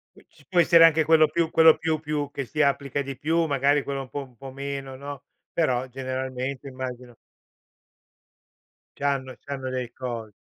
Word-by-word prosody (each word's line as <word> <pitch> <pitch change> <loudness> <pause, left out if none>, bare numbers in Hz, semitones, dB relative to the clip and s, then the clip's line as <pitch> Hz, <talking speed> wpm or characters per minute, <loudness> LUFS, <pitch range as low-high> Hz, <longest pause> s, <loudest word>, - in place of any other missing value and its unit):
Q - - -20
Ci - - -23
può 180 -3 +3
essere, 165 0 +7
anche 160 -1 +5
quello 155 0 +6
più 170 -1 0
quello 160 -1 +6
più 160 -1 0
più 150 -2 -3
che 140 -1 -4
si 150 +5 -5
applica 140 -1 +1
di 135 -1 -5
più, 160 +5 +1
magari, 140 0 +2
quello 140 0 -4
un 130 - -12
po' 145 - -4
un 125 -2 -20
po' 135 +1 -9
meno, 140 0 -5
no, 140 +1 -8 0.3
però 130 -6 +1
generalmente 130 +1 -4
immagino 125 -2 -7 1.8
C'hanno 135 -2 -2
c'hanno 135 -2 -5
dei 125 -2 -3
co 120 -4 -6
140 Hz, 170 wpm, -25 LUFS, 130-150 Hz, 1.8 s, essere